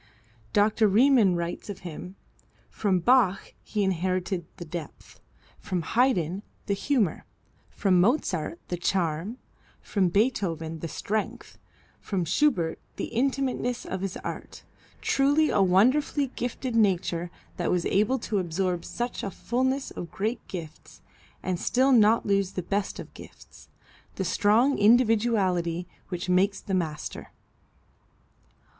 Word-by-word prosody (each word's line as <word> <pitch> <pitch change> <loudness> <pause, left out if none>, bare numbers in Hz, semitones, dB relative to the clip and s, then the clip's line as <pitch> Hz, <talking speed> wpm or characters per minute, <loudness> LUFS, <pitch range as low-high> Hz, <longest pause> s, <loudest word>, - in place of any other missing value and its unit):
Dr. 210 +1 +3
Riemann 220 -2 +5
writes 170 +4 -4
of 200 - -6
him, 180 +2 -8 0.6
"From 190 -4 0
Bach 235 -4 +3
he 210 -2 -1
inherited 185 -1 -1
the 175 - -7
depth, 160 -1 -8 0.4
from 180 -2 -3
Haydn, 195 - +1 0.2
the 200 - 0
humor, 210 - 0 0.5
from 185 -3 +2
Mozart, 180 - 0
the 175 - -2
charm, 175 +4 -1 0.4
from 190 -4 0
Beethoven, 170 -7 0
the 165 - -4
strength, 210 +7 -4 0.4
from 185 -4 -2
Schubert, 175 - +1 0.2
the - - -5
intimateness 255 -1 -1
of 190 0 -4
his 195 -1 -3
art. - - -7 0.4
Truly 290 +3 +3
a 200 - +3
wonderfully 255 +9 +3
gifted 245 0 -3
nature 180 -5 +1 0.3
that 175 - -1
was 175 -1 +1
able 215 +7 +2
to 210 - 0
absorb 180 0 -1
such 240 0 -4
a - - -3
fulness 260 +7 -1
of 170 - -7
great 215 +7 -2
gifts 165 -4 -9 0.4
and 180 -1 -1
still 260 +3 +2
not 225 -2 +5
lose 195 -2 +1
the 185 - -3
best 200 +3 -2
of - - -9
gifts - - -14 0.5
the 190 - -2
strong 220 +9 +3
individuality 205 -6 +3 0.2
which 180 -1 -4
makes 190 +2 +2
the 195 - -5
master." 160 -5 -3
195 Hz, 125 wpm, -27 LUFS, 175-235 Hz, 0.6 s, Riemann